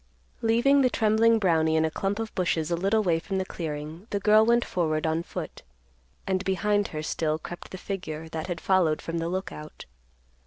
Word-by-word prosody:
Leaving 240 +5 +4
the 255 - +4
trembling 225 0 +3
Brownie 160 -6 +2
in 160 0 +3
a 160 - -1
clump 195 +4 -2
of 225 -1 -4
bushes 170 -3 0
a - - +3
little 200 +5 +1
way 170 -4 +2
from 195 +3 -4
the 190 - -1
clearing, 160 +2 -6
the 200 - -1
girl 215 +2 +5
went 235 +1 +3
forward 155 -3 -1
on 160 +1 +1
foot, - - -7 0.6
and 190 0 0
behind 205 +1 +1
her 155 -1 -5
still 155 0 -1
crept 175 +2 -9
the 185 - -7
figure 165 -5 -5
that 160 0 -5
had 175 -3 -3
followed 175 -5 +2
from 165 0 -4
the 165 +1 -2
Lookout. 175 -4 -6
185 Hz, 195 wpm, -27 LUFS, 160-210 Hz, 0.6 s, girl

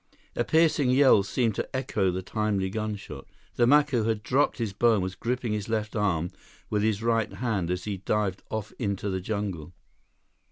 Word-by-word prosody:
A - - +1
piercing 160 -4 +3
yell 130 -5 +6
seemed 110 +3 0
to 130 - -4
echo 110 -7 0
the 90 +1 -3
timely 100 -2 -1
gunshot. 105 -9 -5 0.3
The 120 - +3
Macu 145 -4 +4
had 110 -2 -1
dropped 135 +5 +2
his 115 -5 -2
bow 115 +2 +4
and 100 - 0
was 95 0 -3
gripping 120 +3 -2
his 105 0 -3
left 110 -1 -2
arm 90 -5 0 0.4
with 105 -1 +1
his 110 0 0
right 115 -2 +1
hand 105 -8 -1
as 90 0 -2
he 105 -2 -3
dived 100 0 -1
off 110 -1 -4
into 100 -3 -2
the 95 0 -2
jungle. 95 -6 -4
105 Hz, 185 wpm, -27 LUFS, 95-115 Hz, 0.4 s, yell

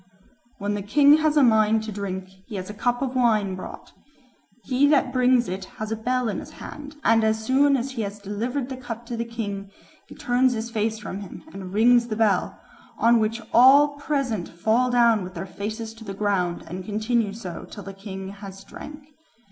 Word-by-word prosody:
"When 205 0 -2
the 205 - -2
king 285 +8 +5
has 310 -1 +1
a 290 - +6
mind 220 -2 +4
to 220 - -5
drink, 190 -2 -4 0.2
he 220 - -7
has 185 +1 -5
a - - -9
cup 245 +4 0
of 260 -1 -3
wine 215 -6 +2
brought; 185 - -9 0.7
he 265 +2 +3
that 290 -1 +3
brings 250 -1 +3
it 185 +1 -4
has 215 0 -4
a - - 0
bell 250 +2 -1
in 210 - -2
his - - -10
hand, 290 0 -9
and 225 -1 +4
as 220 0 +1
soon 275 +3 +4
as 260 +2 -3
he 250 -3 -4
has 200 -1 -4
delivered 230 +6 -3
the 260 - -5
cup 240 -2 -7
to 235 - -5
the 230 - -2
king, 205 -4 -5 0.4
he - - -12
turns 250 +1 +2
his 230 0 -4
face 220 0 -1
from 200 -3 -6
him 200 -3 -9
and 190 -2 -7
rings 240 +2 +5
the 215 - -3
bell, 210 -4 +1 0.4
on 235 0 +4
which 225 +1 -1
all 270 +5 +7
present 275 - -2
fall 220 +8 +1
down 235 -4 +4
with 180 +1 -9
their - - -4
faces 215 +4 -5
to 225 0 -13
the 195 -2 -6
ground, 195 -4 0
and 180 +3 -6
continue 215 +2 0
so 195 -5 -7
till 205 - -9
the 195 - -8
king 195 -1 -7
has 195 -1 -10
drank. 295 +7 -11
225 Hz, 205 wpm, -24 LUFS, 200-250 Hz, 0.7 s, all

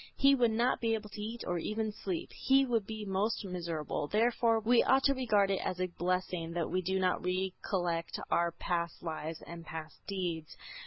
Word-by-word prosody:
He 275 0 +6
would 245 -4 +4
not 235 +3 +1
be 225 -1 +2
able 215 -1 -6
to 210 - -7
eat 225 +3 -5
or 175 -1 -1
even 215 +4 -2
sleep. 190 -5 -4
He 270 0 +4
would 230 -5 0
be 220 -1 -5
most 200 +3 0
miserable. 170 -5 -3
Therefore 230 +3 +3
we 230 +2 +4
ought 265 +1 +4
to 275 - +5
regard 210 -7 +2
it 195 - +1
as 185 - -2
a 185 - +2
great 175 - -11
blessing 180 -2 -1
that 170 -1 -1
we 185 - +1
do 190 +2 0
not 185 -1 +1
recollect 180 -2 -1
our 170 0 +3
past 170 0 -2
lives 160 -1 -4
and 170 0 -8
past 160 -1 -7
deeds. 175 -5 -3
190 Hz, 200 wpm, -32 LUFS, 170-225 Hz, -, He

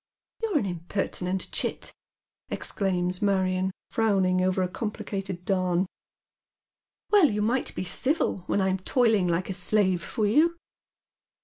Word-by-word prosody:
" - - -41
You're 435 -7 +1
an 260 - 0
impertinent 180 +1 -3
chit," - - -2 0.6
exclaims 180 -2 -1
Marion, 190 -2 +1 0.2
frowning 190 -5 +2
over 185 0 +1
a - - 0
corapHcated 195 -2 -5
darn. 185 -2 +1 1.3
"Well, 400 -8 +6
you 210 0 -1
might 245 +5 -1
be - - -2
civil 255 - +1
when 205 - +1
I'm 190 0 +1
toiling 220 -2 +2
like 175 +2 0
a 190 - -3
slave 185 -1 +2
for 215 +4 -1
you." 315 +11 +3
190 Hz, 130 wpm, -27 LUFS, 185-215 Hz, 1.3 s, Well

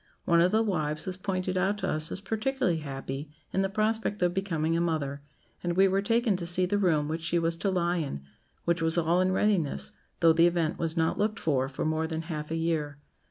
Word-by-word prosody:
One 170 -1 +4
of 180 +2 +4
the 220 +1 +3
wives 155 -7 -1
was 185 -1 -3
pointed 185 -1 -2
out 195 +3 +1
to 190 -2 -2
us 155 -1 0
as 190 - -4
particularly 220 -3 0
happy 135 0 -5 0.2
in 190 - +2
the 195 - 0
prospect 215 -1 0
of 175 0 +2
becoming 165 -4 0
a 170 - +1
mother; 145 -4 -1 0.4
and 175 0 -1
we 195 0 +6
were 195 +1 +1
taken 230 0 +2
to 175 - -4
see 180 +1 +3
the 205 +3 0
room 160 -6 +2
which 160 +2 -3
she 170 +1 0
was 165 0 +1
to 195 - -1
lie 175 -1 +1
in, 140 - -3 0.4
which 170 0 +1
was 165 +1 +1
all 170 +2 +3
in 185 0 +2
readiness, 185 -6 +1 0.3
though 165 -1 +6
the 165 +1 +5
event 170 -2 0
was 165 0 -1
not 160 +4 +1
looked 215 +1 0
for 135 -4 0
for 135 - -4
more 160 +1 0
than 160 0 -3
half 155 -2 -5
a 165 - -2
year. 160 -3 -1
170 Hz, 230 wpm, -28 LUFS, 160-190 Hz, 0.4 s, we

